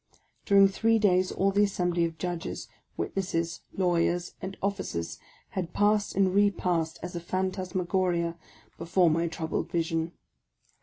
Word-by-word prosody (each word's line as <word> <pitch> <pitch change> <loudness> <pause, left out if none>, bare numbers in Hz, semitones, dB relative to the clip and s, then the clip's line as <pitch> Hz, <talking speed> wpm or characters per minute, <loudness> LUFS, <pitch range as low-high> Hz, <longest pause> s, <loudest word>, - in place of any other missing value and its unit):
During 200 -1 +7
three 225 +4 +2
days 185 -3 +3
all 195 +1 +1
the 205 +1 +4
assembly 175 -3 0
of 165 -1 -5
judges, 175 +1 -4 0.3
witnesses, 170 -3 -2
law 180 -2 +1
yers, 175 +1 0
and 190 +1 -6
officers 190 - -3 0.3
had 180 -3 -4
passed 205 0 +2
and 190 -1 +3
repassed 180 -5 +1
as 175 0 -5
a - - -2
phantasmagoria 185 -1 -1 0.4
before 170 +1 +3
my 165 +2 +1
troubled 160 -1 -3
vision. 165 -1 -1
180 Hz, 135 wpm, -28 LUFS, 170-195 Hz, 0.4 s, During